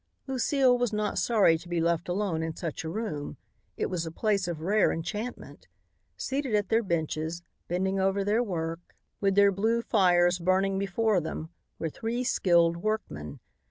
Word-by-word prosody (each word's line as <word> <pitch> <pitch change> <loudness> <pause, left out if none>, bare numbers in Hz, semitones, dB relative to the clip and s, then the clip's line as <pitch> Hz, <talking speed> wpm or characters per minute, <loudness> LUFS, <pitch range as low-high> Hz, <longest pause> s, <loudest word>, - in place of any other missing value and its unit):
Lucile 265 0 +2
was 245 -2 0
not 210 -2 -1
sorry 180 -5 +4
to 175 - -13
be 175 -1 0
left 170 +1 0
alone 180 -3 -1
in 160 0 -3
such 165 -3 -5
a 160 - -4
room. 175 -7 -4 0.4
It - - 0
was 180 -3 -2
a 165 - -4
place 200 +1 0
of 165 -3 -4
rare 205 +4 +3
enchantment. 210 +9 -5 0.5
Seated 270 -4 -1
at 205 -2 0
their 225 +1 +3
benches, 165 -2 -2 0.2
bending 190 +2 0
over 195 +1 +1
their 210 +4 +2
work, 165 -5 -4 0.2
with 195 -1 +1
their 200 0 +6
blue 225 +4 +1
fires 180 -4 +3
burning 190 +2 +1
before 200 0 +1
them, 160 0 -5 0.3
were 165 - -2
three 235 +7 -3
skilled 170 -7 +3
workmen. 170 - -4
190 Hz, 165 wpm, -28 LUFS, 170-215 Hz, 0.5 s, their